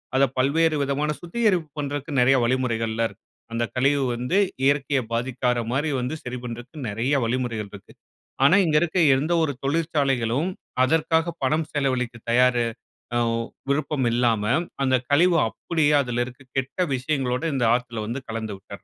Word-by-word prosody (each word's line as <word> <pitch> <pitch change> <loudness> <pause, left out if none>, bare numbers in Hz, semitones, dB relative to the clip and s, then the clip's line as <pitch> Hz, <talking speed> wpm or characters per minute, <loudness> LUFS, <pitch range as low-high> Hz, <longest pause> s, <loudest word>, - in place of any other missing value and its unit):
அத 135 - +4
பல்வேறு 155 +4 +2
விதமான 140 +2 -1
சுத்திகரிப்பு 180 -3 0
பண்றதுக்கு 145 +1 -4
நெறைய 135 +2 +5
வழிமுறைகள்லாம் 115 -2 0
இருக்கு. - - -20 0.3
அந்த 120 0 0
கழிவு 140 +2 +2
வந்து 125 +11 -1 0.3
இயற்கைய 140 -1 +2
பாதிக்காத 125 0 0
மாரி 145 +4 0
வந்து 130 +6 -3
சரி 125 0 -5
பண்றக்கு 120 +4 -8
நிறைய 120 +7 0
வழிமுறைகள் 115 -4 -2
இருக்கு."ஆனா, 135 - -1
இங்க 155 -2 +3
இருக்க 175 +2 0 0.2
எந்த 155 +5 0
ஒரு 145 - 0
தொழிற்சாலைகளும் 140 -2 0 0.3
அதற்காக 160 +3 +2
பணம் 155 +4 +1
செலவழிக்க 130 -4 -1
தயாரு 125 0 +4 0.5
அ - - +3 0.5
விருப்பம் 140 -2 0
இல்லாம, 115 -3 +2 0.4
அந்த 130 -1 +3
கழிவு 170 +4 +4
அப்பிடியே 150 +6 0
அதுல 120 -2 -2
இருக்க 130 +1 -12 0.2
கெட்ட 130 +5 -2 0.2
விஷயங்களோட 130 0 -1
இந்த 130 -3 0
ஆத்துல 120 -3 -2
வந்து 125 +4 -3
கலந்துவிட்றது. 105 -3 -6
130 Hz, 135 wpm, -24 LUFS, 120-150 Hz, 0.5 s, நெறைய